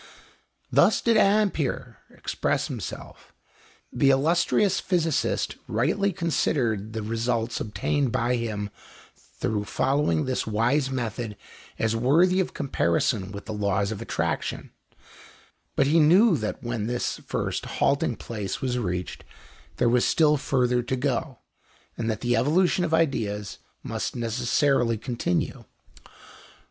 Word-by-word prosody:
Thus -, -, +4 dB
did 230 Hz, -1 st, +2 dB
Ampère 200 Hz, -8 st, +1 dB
express -, -, -2 dB
himself. -, -, -8 dB, 0.6 s
The 140 Hz, -, +3 dB
illustrious 170 Hz, +7 st, +3 dB
physicist 165 Hz, -5 st, 0 dB
rightly 165 Hz, -, +1 dB
considered 120 Hz, -, 0 dB
the 110 Hz, -1 st, -3 dB
results 115 Hz, +1 st, -1 dB
obtained 125 Hz, +5 st, -1 dB
by 120 Hz, +3 st, +1 dB
him 105 Hz, -4 st, -3 dB, 0.7 s
through 105 Hz, -1 st, -1 dB
following 130 Hz, -, +1 dB
this 130 Hz, -3 st, -2 dB
wise 120 Hz, +6 st, +1 dB
method 120 Hz, -4 st, -4 dB, 0.4 s
as 115 Hz, 0 st, 0 dB
worthy 165 Hz, +11 st, +3 dB
of 185 Hz, -, -1 dB
comparison 95 Hz, -, 0 dB
with 100 Hz, 0 st, -8 dB
the 110 Hz, -, -5 dB
laws 100 Hz, 0 st, 0 dB
of 110 Hz, 0 st, -5 dB
attraction; -, -, -3 dB, 1.0 s
but 135 Hz, -, +3 dB
he 155 Hz, +4 st, +4 dB
knew 180 Hz, +6 st, +6 dB
that 110 Hz, -6 st, -4 dB
when 120 Hz, -3 st, -2 dB
this 120 Hz, 0 st, -2 dB
first -, -, -2 dB
halting -, -, +2 dB
place 105 Hz, -4 st, -5 dB
was 125 Hz, -2 st, -1 dB
reached 90 Hz, -4 st, -4 dB, 0.5 s
there 120 Hz, -, +2 dB
was 120 Hz, +1 st, +3 dB
still 150 Hz, -2 st, +4 dB
further 125 Hz, -3 st, +1 dB
to 120 Hz, +2 st, -2 dB
go, 130 Hz, 0 st, -2 dB, 0.6 s
and 115 Hz, -1 st, -2 dB
that 110 Hz, -2 st, -2 dB
the 120 Hz, -1 st, +1 dB
evolution 170 Hz, +9 st, +2 dB
of 170 Hz, -, -1 dB
ideas 115 Hz, -11 st, 0 dB, 0.2 s
must -, -, -3 dB
necessarily 120 Hz, +1 st, +1 dB
continue. 115 Hz, -6 st, -2 dB
125 Hz, 125 wpm, -25 LUFS, 110-150 Hz, 1.0 s, knew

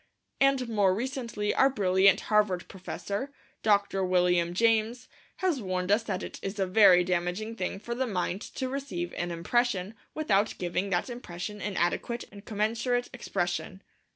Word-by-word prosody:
And, 275 Hz, -2 st, +3 dB
more 205 Hz, -5 st, +2 dB
recently, 235 Hz, -3 st, -2 dB
our 270 Hz, -, +5 dB
brilliant 195 Hz, -4 st, +4 dB
Harvard 210 Hz, -4 st, +1 dB
Professor, 200 Hz, +6 st, -5 dB, 0.3 s
Dr. 200 Hz, -2 st, +2 dB
William 180 Hz, -1 st, +2 dB
James, 225 Hz, +2 st, +2 dB, 0.3 s
has 350 Hz, -9 st, 0 dB
warned 185 Hz, -1 st, -2 dB
us 210 Hz, +3 st, +4 dB
that 200 Hz, -4 st, -3 dB
it -, -, -7 dB
is 195 Hz, +2 st, -4 dB
a 195 Hz, -, +1 dB
very 185 Hz, -2 st, +6 dB
damaging 180 Hz, +5 st, -2 dB
thing 185 Hz, -2 st, -3 dB
for 235 Hz, +3 st, -5 dB
the 260 Hz, +2 st, -1 dB
mind 185 Hz, -1 st, -2 dB
to 260 Hz, -, -2 dB
receive 255 Hz, -11 st, -4 dB
an 175 Hz, -, -3 dB
impression 190 Hz, +3 st, 0 dB, 0.2 s
without 215 Hz, -9 st, +1 dB
giving 180 Hz, +2 st, -2 dB
that 175 Hz, -2 st, 0 dB
impression 210 Hz, -4 st, -6 dB
an 205 Hz, -3 st, -3 dB
adequate 235 Hz, +7 st, 0 dB
and 200 Hz, 0 st, -12 dB
commensurate 230 Hz, +3 st, 0 dB
expression. 185 Hz, -5 st, -3 dB
205 Hz, 155 wpm, -28 LUFS, 185-235 Hz, 0.3 s, very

